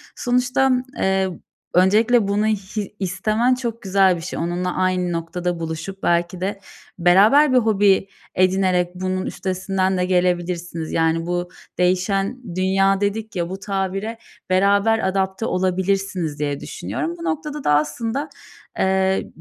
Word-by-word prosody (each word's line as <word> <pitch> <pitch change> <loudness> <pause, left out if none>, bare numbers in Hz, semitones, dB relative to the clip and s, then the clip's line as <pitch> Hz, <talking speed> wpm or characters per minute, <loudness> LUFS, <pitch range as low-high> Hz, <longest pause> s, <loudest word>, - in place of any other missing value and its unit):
sonuçta, 250 +2 +1 0.3
eee, 190 0 +1 0.4
öncelikle 210 +5 +4
bunu 205 +2 +1
hi 210 -1 -3
istemen 215 +7 +1
çok 235 -2 -4
güzel 190 -1 +3
bir 165 - -7
şey. - - -5
Onunla 175 +2 -2
aynı 185 -1 0
noktada 170 +1 -3
buluşup 165 +4 -6
belki 175 +1 0
de 195 +1 -2 0.4
beraber 215 - +5
bir - - +5
hobi 205 -4 +3 0.3
edinerek 185 -1 +2
bunun 185 0 -2
üstesinden 190 0 -1
de 180 - +1
gelebilirsiniz, 175 -2 -1
yani, 165 0 +1
bu 175 0 -2 0.3
"değişen 195 +3 0
dünya" 195 +1 +2
dedik 215 +2 -2
ya, 175 -1 -2
bu 190 +1 -6
tabire 195 +3 -3 0.3
beraber 200 +4 +3
adapte 190 +2 -1
olabilirsiniz 185 -3 -1
diye 145 -1 -2
düşünüyorum. 335 +1 -4
Bu 335 - -7
noktada 300 -4 -3
da - - +2
aslında, 225 - -1 0.5
eee, 190 0 +1
190 Hz, 130 wpm, -21 LUFS, 180-210 Hz, 0.5 s, beraber